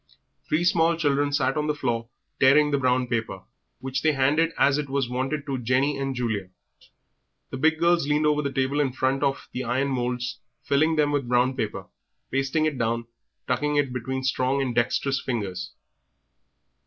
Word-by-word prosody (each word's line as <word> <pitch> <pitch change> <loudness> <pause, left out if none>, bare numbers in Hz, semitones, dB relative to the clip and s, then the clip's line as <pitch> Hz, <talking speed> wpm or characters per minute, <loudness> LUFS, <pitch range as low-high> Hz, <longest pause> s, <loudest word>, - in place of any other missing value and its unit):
Three 160 +3 +1
small 170 -1 +3
children 145 -2 +1
sat 135 -2 +1
on 150 0 -1
the 150 - 0
floor 115 -4 -2 0.3
tearing 145 +3 +5
the 140 - +1
brown 130 -1 +2
paper, 110 -6 -3 0.4
which 130 0 -3
they 155 -1 +3
handed 145 +5 +2
as 140 +1 +3
it 145 -2 -4
was 135 -2 0
wanted 130 +4 -2
to 135 -3 -3
Jenny 130 +4 +1
and 135 -1 -2
Julia. 110 -6 -2 1.0
The - - -4
big 160 +4 +3
girls 170 -2 +2
leaned 150 +1 +2
over 150 0 +2
the 140 -2 -2
table 135 +2 0
in 135 -3 +1
front 130 +1 0
of 140 -1 -1 0.2
iron 130 +3 0
moulds, 125 -2 -2 0.2
filling 155 +3 +2
them 150 -1 +2
with 140 -4 -1
brown 125 +1 +2
paper, 105 -6 -3 0.5
pasting 135 +4 +1
it 150 -4 -1
down, 115 0 -1 0.4
tucking 145 +4 0
it 145 -2 +2
in - - -8
with 130 +1 -3
strong 130 +1 +1
and 130 -3 -1
dexterous 130 +3 0
fingers. 95 -7 -4
135 Hz, 180 wpm, -25 LUFS, 125-145 Hz, 1.0 s, tearing